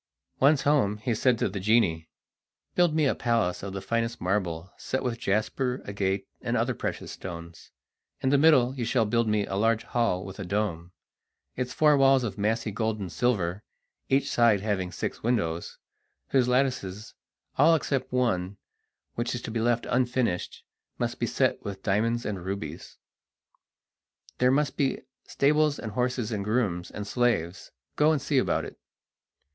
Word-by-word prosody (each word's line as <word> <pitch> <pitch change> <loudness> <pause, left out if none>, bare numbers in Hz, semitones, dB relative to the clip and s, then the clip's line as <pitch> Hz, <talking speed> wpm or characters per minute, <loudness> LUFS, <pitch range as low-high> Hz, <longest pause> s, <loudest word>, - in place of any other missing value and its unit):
Once 140 +1 +4
home 135 -9 +2
he 115 +3 -1
said 120 +2 +2
to - - +1
the 100 0 -4
genie: 95 -6 +2 0.6
"Build 175 -3 +3
me 155 -2 +3
a 135 - +3
palace 115 -7 0
of 100 - -5
the 95 0 -6
finest 115 +3 -1
marble, 90 -2 -2
set 130 - -3
with 120 -2 -2
jasper, 125 +5 0
agate, 100 -1 -2
and - - -1
other - - +1
precious - - -4
stones. 85 -2 -9 0.5
In 130 - 0
the 140 - +4
middle 135 -5 +5
you 125 - -3
shall 115 0 +2
build 115 +2 +1
me 105 -1 +1
a - - -6
large 115 +2 +2
hall 115 -7 0
with 95 +2 -9
a - - -3
dome, 90 -3 -2 0.6
its 125 -1 -3
four 150 +1 +4
walls 135 -1 +5
of 110 - -3
massy 110 +1 -1
gold 110 +1 -1
and 95 -4 -5
silver, 100 -5 0 0.5
each 135 +1 +2
side 115 -4 +4
having 100 -4 -1
six - - -4
windows, 95 -9 -1 0.5
whose 130 -2 +3
lattices, 125 -6 -1 0.5
all 165 +4 +6
except 135 -4 -2
one, 100 -7 0 0.6
which 120 +1 -2
is 120 - -4
to - - -5
be 115 - -1
left 120 +1 +1
unfinished, 125 -7 0 0.3
must - - -2
be - - 0
set - - 0
with 100 -1 -6
diamonds 115 +4 +1
and 100 -4 -4
rubies. 90 -4 -6 1.4
There 125 - +4
must 145 +2 +1
be 135 -3 0 0.3
stables 150 +1 +2
and 110 - -6
horses 125 0 -1
and 105 -3 -2
grooms 100 -5 -1
and 105 - -6
slaves; 105 -7 0 0.3
go 150 +1 +5
and 155 - +1
see 140 0 +1
about - - 0
it!" - - -11
115 Hz, 165 wpm, -27 LUFS, 100-125 Hz, 1.4 s, all